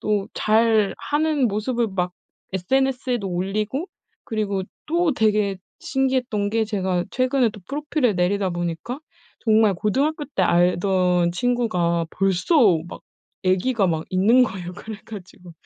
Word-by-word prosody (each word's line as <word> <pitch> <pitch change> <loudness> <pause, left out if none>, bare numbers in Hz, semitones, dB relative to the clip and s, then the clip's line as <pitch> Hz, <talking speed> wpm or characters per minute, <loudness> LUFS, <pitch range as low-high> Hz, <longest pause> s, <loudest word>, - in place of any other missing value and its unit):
또 205 -2 -1
잘 220 -1 +3
하는 295 -3 +1
모습을 225 +3 -1
막 180 -1 -1 0.4
SNS에도 250 +2 0
올리고 210 - -2 0.4
그리고 205 -3 -2 0.2
또 340 0 +1
되게 210 -4 +1 0.2
신기했던 255 -6 0
게 225 0 +1
제가 190 -4 -1
최근에 255 -1 +2
또 210 - -12
프로필을 290 -5 0
내리다 190 +2 +1
보니까 175 - -4 0.4
정말 220 -3 +3
고등학교 280 - 0
때 190 - +1
알던 180 0 +2
친구가 180 -6 0
벌써 195 - +3
막 - - -10 0.4
애기가 190 +3 +2
막 160 -1 -1
있는 210 +8 +4
거예요. 180 -6 -6
그래 220 +3 -8
가지고 180 -4 -11
210 Hz, 275 characters per minute, -22 LUFS, 185-250 Hz, 0.4 s, 있는